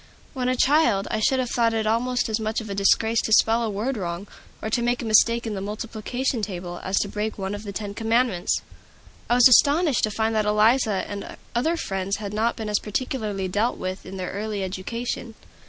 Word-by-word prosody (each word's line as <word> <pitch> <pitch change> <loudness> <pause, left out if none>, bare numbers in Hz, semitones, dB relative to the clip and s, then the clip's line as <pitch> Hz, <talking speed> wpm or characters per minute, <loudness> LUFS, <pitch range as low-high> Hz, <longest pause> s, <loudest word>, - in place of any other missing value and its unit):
When 255 -2 -1
a 255 - +1
child, 250 -7 +3
I - - 0
should 260 +5 +2
have 250 -2 -2
thought 230 -1 +2
it 220 -1 0
almost 245 +3 +1
as 220 0 -1
much 220 0 -1
of 220 -3 -7
a - - -1
disgrace 220 +3 +3
to - - -4
spell 225 +2 +4
a 230 - -1
word 220 +6 -2
wrong, 175 0 -4 0.3
or 220 - -5
make 240 +1 0
a - - -4
mistake 230 +2 +4
in 220 - -3
the 195 - -4
multiplication 225 +4 -3
table, 180 -3 -5
as 190 +1 -1
to - - -1
break 210 +2 -3
one 195 0 -3
of 205 - -5
the 205 -2 -6
Ten 200 0 -5
Commandments. 225 -4 +1 0.7
I 240 - +4
was 245 0 +8
astonished 285 +3 +4
to - - -3
find 220 +1 -1
that 215 -1 +1
Eliza 215 0 +3
and 205 -1 -7 0.2
other 315 +8 +1
friends 195 - -2
had 205 -1 -6
not 225 +2 +1
been 220 - -5
as 210 -1 +1
particularly 210 -3 -3
dealt 205 +6 0
with 185 +1 -5
in 190 +1 -8
their 185 -1 -4
early 205 0 -3
education. 225 +5 -4
220 Hz, 215 wpm, -24 LUFS, 200-235 Hz, 0.7 s, was